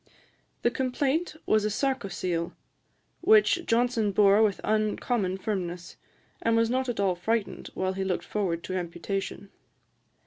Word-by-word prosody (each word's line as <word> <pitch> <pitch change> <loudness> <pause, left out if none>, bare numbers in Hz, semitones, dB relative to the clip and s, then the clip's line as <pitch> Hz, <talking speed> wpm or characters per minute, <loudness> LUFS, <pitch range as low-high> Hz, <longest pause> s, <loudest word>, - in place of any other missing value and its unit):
The 240 - +3
complaint 270 +6 -1
was 215 -1 +3
a 215 - +1
sarcocele, 195 -9 -2 0.7
which 400 -2 +5
Johnson 230 -2 +2
bore 200 +1 +5
with 210 -3 +2
uncommon 215 -2 0
firmness, 180 -4 -4 0.5
and 230 0 +2
was 230 0 +2
not 260 0 0
at 235 - -3
all 195 -2 +2
frightened 215 +4 -2
while 185 0 -1
he 190 0 -2
looked 190 -1 -2
forward 180 -5 -2
to 185 - -5
amputation. 185 +3 -4
210 Hz, 135 wpm, -27 LUFS, 185-240 Hz, 0.7 s, which